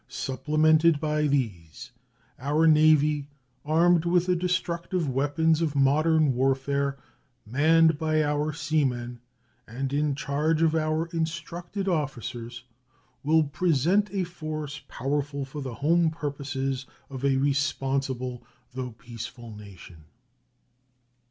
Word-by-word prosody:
Supplemented 155 +4 +2
by 150 0 0
these, 120 - -3 0.5
our 150 +5 +1
Navy, 150 -2 +4 0.4
armed 165 +2 +3
with 175 0 +2
the 180 0 +2
destructive 175 -1 -1
weapons 145 +5 +1
of 155 -3 -1
modern 150 +2 +3
warfare, 135 +2 0 0.5
manned 160 +6 +3
by 155 -1 +1
our 150 +1 0
seamen, 130 -6 -1 0.5
and 135 +4 -4
in 145 -1 +1
charge 150 +3 0
of 160 -1 +3
our 155 0 0
instructed 170 +4 -4
officers, 120 - -3 0.6
will 160 +2 +3
present 170 +6 +1
a 195 -2 -1
force 155 -4 -6
powerful 140 +1 -3
for 140 +2 -7
the 130 -4 -6
home 165 +6 +2
purposes 135 -3 -4 0.2
of 135 -1 -7
a 135 -1 +2
responsible 135 -3 -1 0.3
though 125 -2 -5
peaceful 115 -1 -9
nation. 95 -6 -13
145 Hz, 110 wpm, -26 LUFS, 135-160 Hz, 0.6 s, Navy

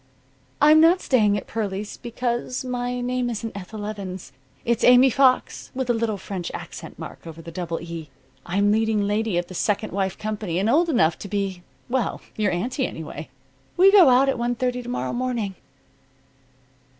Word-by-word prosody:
"I'm 305 +1 +7
not 340 +3 +6
staying 210 - +3
at - - -5
Pearlie's 205 -2 -4
because 240 +1 -3
my 245 0 -2
name 250 0 -1
isn't 225 -1 -5
Ethel 205 +2 -7
Evans. 195 -3 -6 0.3
It's 235 0 +1
Aimee 250 +1 +7
Fox, 260 0 +2
with 260 -2 0
a - - +2
little 225 -2 -1
French 190 -2 -5
accent - - -9
mark - - -9
over 165 0 -9
the 165 0 -9
double 170 -1 -4
E. 165 -2 -7 0.3
I'm 200 +3 +1
leading 220 -1 +2
lady 210 -1 0
of 175 - 0
the 185 - -11
'Second 205 +3 -1
Wife' 190 -1 -1
company 210 -5 -3
and 195 +3 +1
old 335 +5 +3
enough 165 - +2
to - - -7
be 195 -2 -2 0.3
well, 255 0 -1 0.2
your 210 -2 +1
aunty, 250 - -1
anyway. 155 -1 -8 0.5
We 380 +2 +7
go 380 -8 +8
out 255 +2 +5
at 270 -3 0
one 240 +1 0
thirty 250 0 -1
to 240 - -8
morrow 250 - -2
morning." 240 -5 -2
220 Hz, 175 wpm, -23 LUFS, 195-250 Hz, 0.5 s, go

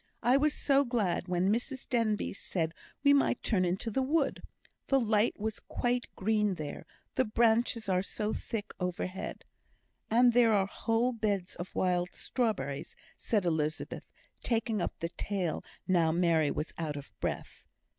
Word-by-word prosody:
I 245 +3 +5
was 295 +2 +3
so 280 -1 +3
glad 210 -9 0
when 180 +3 +2
Mrs 255 +3 -3
Denbigh 225 -4 0
said 165 -5 -2 0.3
we 285 0 +7
might 275 -3 +2
turn 195 -5 +2
into 185 +6 -1
the 265 - +1
wood. 285 +2 +1 0.5
The 275 - +4
light 220 -2 +2
was 220 +1 -2
quite 245 -1 -1
green 210 -1 +1
there, 150 -3 -6 0.3
the 260 - +3
branches 230 0 +2
are 185 -1 +2
so 210 +2 -2
thick 215 -2 -4
overhead." 180 +1 -4 0.6
"And 240 +2 +5
there 235 -2 +5
are 195 -2 +3
whole 225 +4 0
beds 205 -6 -1
of 175 +2 -7
wild 180 -1 +1
strawberries," 165 - -2 0.2
said 210 -5 0
Elizabeth, 155 -2 -2 0.3
taking 225 -3 0
up - - -3
the 165 - -3
tale 185 -2 -2 0.2
now 170 -3 +3
Mary 165 -3 +3
was 150 - -3
out 155 -3 -2
of 145 - -9
breath. - - -4
210 Hz, 155 wpm, -31 LUFS, 180-240 Hz, 0.6 s, we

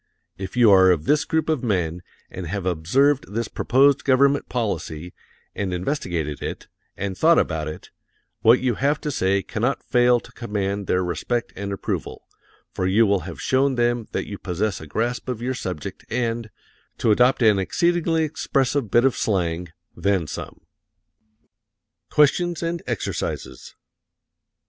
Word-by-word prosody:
If 95 +5 -7
you 120 -4 +6
are 95 -1 +7
of 80 -4 +2
this 150 0 +2
group 160 -1 0
of 155 -6 0
men, 90 -6 -1 0.3
and 90 -2 -6
have 95 +2 -4
observed 130 - +1
this 115 -1 -1
proposed 135 +2 +3
government 140 +1 +3
policy, 90 -8 -3 0.4
and 100 -2 -3
investigated 90 - -2
it, - - -5 0.3
and 100 -1 -3
thought 165 - +4
about 80 -2 0
it, 75 - -8 0.5
what 115 +3 +6
you 125 -2 +1
have 145 +2 +2
to 150 - -2
say 95 -4 +1
cannot 120 +4 -2
fail 125 -1 +3
to - - -16
command 100 -3 -3
their 90 0 +1
respect 115 +7 -2
and 100 +1 -5
approval, 100 - -4 0.5
for 95 - -1
you 105 +5 +4
will 100 -1 +2
have 85 - -9
shown 135 0 +2
them 120 -1 0
that - - -2
you 100 - -7
possess 95 +2 -2
a 80 - -9
grasp 120 - -2
of 125 -3 -3
your 125 +2 -2
subject 90 - -6
and 115 -1 -2 0.5
to 110 - +2
adopt 125 +3 +4
an 105 -3 +5
exceedingly 165 - +1
expressive 140 -5 0
bit 120 +5 +4
of 135 - +3
slang 90 -4 -1 0.3
then 100 -4 +1
some. 75 - -7 1.5
QUESTIONS 170 +3 +2
AND 170 0 -2
EXERCISES - - -4
1. - - -59
115 Hz, 155 wpm, -23 LUFS, 95-135 Hz, 1.5 s, are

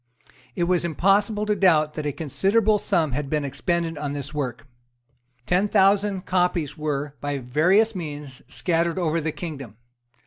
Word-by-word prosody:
It 175 - 0
was 175 0 +2
impossible 200 +6 +2
to 210 0 +1
doubt 160 -6 +3
that 155 -1 -4
a - - 0
considerable 200 - +1
sum 160 -6 +1
had 140 +2 -3
been 150 -1 0
expended 165 +2 -2
on 145 -1 -3
this 140 0 -5
work. 135 -4 -4 0.8
Ten 180 +6 +2
thousand 195 -1 +2
copies 180 -5 0
were, 145 -2 -3
by 145 -1 -2
various 175 - +2
means, 145 -7 -7
scattered 170 0 0
over 165 -2 0
the 160 +1 -2
kingdom. 140 - -7
165 Hz, 150 wpm, -24 LUFS, 145-190 Hz, 0.8 s, doubt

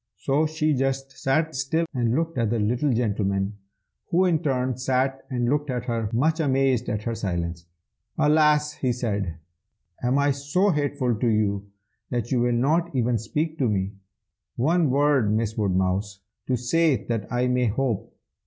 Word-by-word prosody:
So 150 +3 +1
she 155 0 0
just 135 0 -1
sat 155 +5 0
still 135 +5 0
and 120 -2 +1
looked 165 +1 -1
at 115 -2 +1
the 120 - 0
little 120 +7 +1
gentleman, 100 -3 -1 0.5
who 180 +2 +3
in 170 -4 +2
turn 130 -4 0
sat 130 +2 0
and 120 -3 -1
looked 145 +2 0
at 125 -1 -2
her, 115 -3 -1
much 155 +8 +1
amazed 135 -4 +1
at 105 0 -2
her 115 - -2
silence. 85 -5 -3 0.5
"'Alas!' 150 -1 +3
he 130 -4 -1
said, 100 -8 -2 0.7
'am 125 +2 +1
I 140 0 +3
so 145 +9 +1
hateful 145 -5 0
to 120 - 0
you 100 -2 0 0.4
that 120 -2 -2
you 130 - +2
will 120 0 +2
not 155 +8 +2
even 120 -2 +1
speak 155 +8 -3
to 130 -4 +2
me? 95 -1 -1 0.6
One 160 +4 +2
word, 140 -5 +3
Miss 110 0 0
Woodmouse, 95 0 0 0.3
to 130 - +2
say 135 0 +1
that 115 -3 -3
I 125 0 +1
may 125 -1 +2
hope!' 115 0 -1
125 Hz, 165 wpm, -25 LUFS, 110-145 Hz, 0.7 s, who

